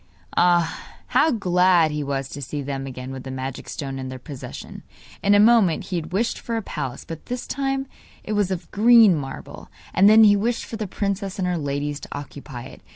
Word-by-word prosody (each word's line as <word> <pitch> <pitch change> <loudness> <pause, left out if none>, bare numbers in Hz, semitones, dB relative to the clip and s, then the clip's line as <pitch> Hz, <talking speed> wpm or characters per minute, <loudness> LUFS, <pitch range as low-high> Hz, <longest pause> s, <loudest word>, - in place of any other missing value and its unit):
Ah, 175 -1 +3 0.3
how 320 - +4
glad 180 - +3
he 150 0 -2
was 135 -1 -2
to 145 - -7
see 140 +2 -4
them 135 0 -4
again 130 0 -7
with 135 -1 -6
the 130 - -8
magic 130 0 -5
stone 135 -2 -5
in 130 0 -5
their 130 - -6
possession. 135 +1 -9 0.4
In 200 +1 +4
a - - +6
moment 210 -6 +5
he 180 - -3
had 165 0 -5
wished 220 +6 0
for 230 -1 -3
a 225 - -3
palace, 140 -9 -5
but 165 -1 -9
this 250 0 -4
time 270 0 -2 0.4
it 215 - -3
was 205 -3 +1
of 185 -2 -5
green 225 -2 +6
marble; 135 -3 -7 0.2
and 195 +3 +6
then 220 +1 +8
he 205 -1 +7
wished 230 +4 -1
for - - -7
the 215 -2 -3
princess 195 0 -3
and 185 -2 -1
her 180 - 0
ladies 145 -1 -2
to - - -11
occupy 140 -3 -8
it. 130 - -12
175 Hz, 215 wpm, -23 LUFS, 140-205 Hz, 0.4 s, then